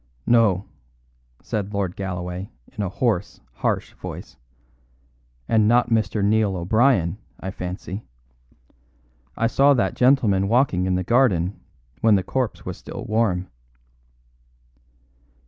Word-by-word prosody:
"No," 105 -5 +3 0.8
said 105 -1 -3
Lord 95 -3 -1
Galloway 90 0 -5 0.3
in - - -3
a 100 - -1
hoarse, 105 -2 -1
harsh - - -2
voice. - - -9 1.1
"And 110 -2 +3
not 120 +1 +3
Mr. 110 -2 +1
Neil 105 -2 +2
O'Brien, 100 0 +2 0.2
I 95 - -5
fancy. 95 +2 -6 1.4
I 115 - +1
saw 140 +4 +4
that 120 - +1
gentleman 115 -7 +3
walking 110 -6 +2
in 90 - +1
the 90 - -1
garden 100 -6 +2 0.4
when 110 -2 +5
the 95 - +1
corpse 125 +3 -2
was - - -5
still - - -8
warm." 100 -5 0
105 Hz, 115 wpm, -23 LUFS, 95-115 Hz, 1.4 s, when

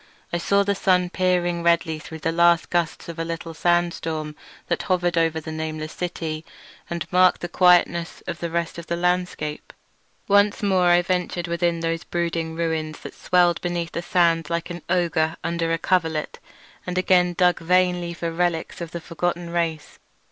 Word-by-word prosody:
I 175 - +1
saw 200 +3 +2
the 200 0 +1
sun 180 -2 +2
peering 175 -2 +1
redly 170 -2 +2
through 160 +1 -9
the 165 - 0
last 170 0 +3
gusts 175 -2 -1
of 170 -1 -7
a - - 0
little 165 0 -5
sandstorm 165 -2 0 0.3
that - - 0
hovered 175 -2 0
over 165 -1 +2
the 160 0 -7
nameless 155 0 -4
city, 165 -3 -4 0.5
and 170 -1 -3
marked 180 0 +4
the 175 - -3
quietness 175 -1 +3
of - - -5
the 170 - -3
rest 170 0 -2
of 170 - -10
the 170 - -1
landscape. 180 -4 -2 0.6
Once 205 +1 +3
more 190 -3 +3
I 175 0 +5
ventured 180 -1 -1
within 170 0 0
those 165 0 -2
brooding 165 -2 -2
ruins 160 -2 -2
that - - -8
swelled 175 -1 +2
beneath 175 -1 -2
the 170 - -3
sand 170 -2 +2
like 170 +1 -2
an 175 0 -6
ogre 165 -3 +1
under 170 0 -1
a 165 - +2
coverlet, 165 -3 -1 0.5
and 180 0 -3
again 180 -1 +3
dug 180 0 +3
vainly 180 0 +1
for 170 -1 -3
relics 170 0 -1
of 170 - -4
the 170 - -5
forgotten 175 +1 -3
race. 165 -3 -2
170 Hz, 175 wpm, -23 LUFS, 165-180 Hz, 0.6 s, I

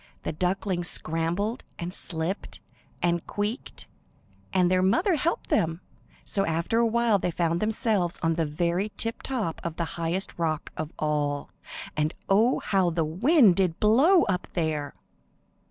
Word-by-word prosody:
The - - -2
ducklings 180 +1 -1
scrambled 175 +9 -2
and 175 +1 -4
slipped 170 +1 -3 0.4
and 170 -1 +1
queeked, 210 +6 -4 0.7
and 185 -3 +3
their 185 0 +3
mother 335 - +3
helped 325 +2 -1
them; 165 -3 +1 0.4
so 195 - 0
after 165 +6 0
a 235 - +4
while 230 -2 +2
they 180 - -1
found 170 0 0
themselves 215 -4 0
on 165 0 +3
the 165 -1 0
very 175 +7 -1
tip 230 0 -2
top 225 -11 -3
of 170 -2 -4
the 170 - -1 0.2
highest 175 +3 -1
rock 160 -2 -1
of 155 0 -4
all, 145 -2 -1 0.4
and 155 +1 0
oh, 220 +6 +4
how 190 -3 +2
the 165 -1 0
wind 215 - +4
did 180 -4 +1
blow 275 - +5
up 180 -3 -1
there. 155 -4 -2
180 Hz, 150 wpm, -27 LUFS, 165-215 Hz, 0.7 s, blow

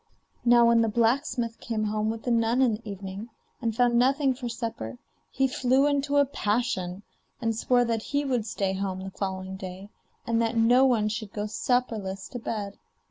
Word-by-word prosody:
Now 240 -1 +6
when 230 0 +5
the 225 - +2
blacksmith 235 +1 0
came 220 -2 -2
home 215 0 0
with 225 0 -4
the 245 - -1
nun 230 +1 +2
in 240 -4 +3
the 215 0 -6
evening, 195 +3 -7 0.3
and 230 -2 -1
found 240 0 +3
nothing 270 +2 +3
for 245 -1 -5
supper, 225 - -5 0.3
he 270 0 +1
flew 260 +1 +2
into 285 0 +1
a 285 - +6
passion; 205 -7 -1 0.4
and 225 -2 -1
swore 245 +2 +2
that 230 -1 -1
he 285 +5 -1
would 245 -5 -1
stay 195 -2 -1
at 190 - -3
home 190 -1 -3
the 190 - -6
following 190 -1 -4
day, 190 +1 -8 0.4
and 230 0 +1
that 230 0 0
no 245 +4 +5
one 230 -5 +3
should 215 -1 -4
go 210 0 -3
supperless 215 -4 -1
to 245 - -6
bed. 205 -3 -4
230 Hz, 190 wpm, -27 LUFS, 205-245 Hz, 0.4 s, Now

